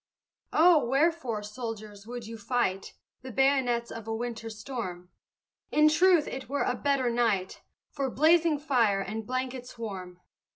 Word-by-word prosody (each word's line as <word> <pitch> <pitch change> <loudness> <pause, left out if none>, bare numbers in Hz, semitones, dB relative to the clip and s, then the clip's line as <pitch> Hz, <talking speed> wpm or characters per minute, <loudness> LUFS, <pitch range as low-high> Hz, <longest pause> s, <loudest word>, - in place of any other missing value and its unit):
Oh, 325 -2 +5
wherefore, 265 -4 +1
soldiers, 215 -2 -7
would 240 -1 -6
you 225 +1 -7
fight 215 -4 -2 0.3
The 260 0 -8
bayonets 255 -2 +2
of 225 -1 -8
a 225 - -2
winter 230 -1 -4
storm? 215 -6 -6 0.6
In 305 0 +5
truth 345 0 +4
it 265 -2 -6
were 285 +1 0
a - - 0
better 265 -1 0
night 225 -6 0 0.3
For 275 -2 -2
blazing 315 +3 +4
fire 240 -9 +2
and 215 +2 -5
blankets 255 -1 -4
warm! 185 -5 -7
245 Hz, 140 wpm, -28 LUFS, 215-275 Hz, 0.6 s, Oh